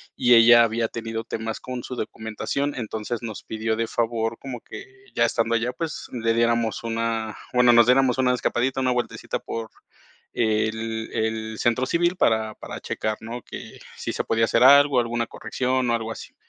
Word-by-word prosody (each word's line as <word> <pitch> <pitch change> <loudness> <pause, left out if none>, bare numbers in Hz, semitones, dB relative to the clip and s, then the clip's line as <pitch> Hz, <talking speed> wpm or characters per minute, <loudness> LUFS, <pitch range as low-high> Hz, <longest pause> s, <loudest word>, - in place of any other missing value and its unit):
y 120 - +4
ella 120 0 +8
había 115 0 0
tenido 115 -1 -5
temas 110 -1 -4
con 125 -1 -6
su 130 - -6
documentación, 110 +6 -3
entonces 110 0 -4
nos 110 -4 -7
pidió 110 0 -2
de 115 +1 -1
favor 115 0 -1
como 125 -4 -7
que 390 - -10 0.3
ya - - +4
estando 115 0 0
allá, 120 +2 +1
pues, 155 +4 -5
le 115 -2 0
diéramos 115 -1 +1
una 115 -1 -2 0.2
bueno, 125 -1 +5
nos 120 -1 +7
diéramos 125 0 +4
una 125 -1 +3
escapadita, 125 +1 0
una 130 -1 +2
vueltecita 125 -1 -2
por 115 -1 -6 0.6
el 110 0 -1
el 110 0 -2
centro 120 +2 +1
civil 175 +4 +1
para, 110 -9 +1
para - - -8
checar, 110 0 -3
¿no? 115 +2 -6
Que - - -10 0.2
si - - -4
se - - -2
podía 115 0 +2
hacer - - +2
algo, 140 0 +7
alguna 120 0 -1
corrección 130 -1 -1
o - - +2
algo 115 -1 -4
así. - - -9
115 Hz, 180 wpm, -24 LUFS, 110-125 Hz, 0.6 s, ella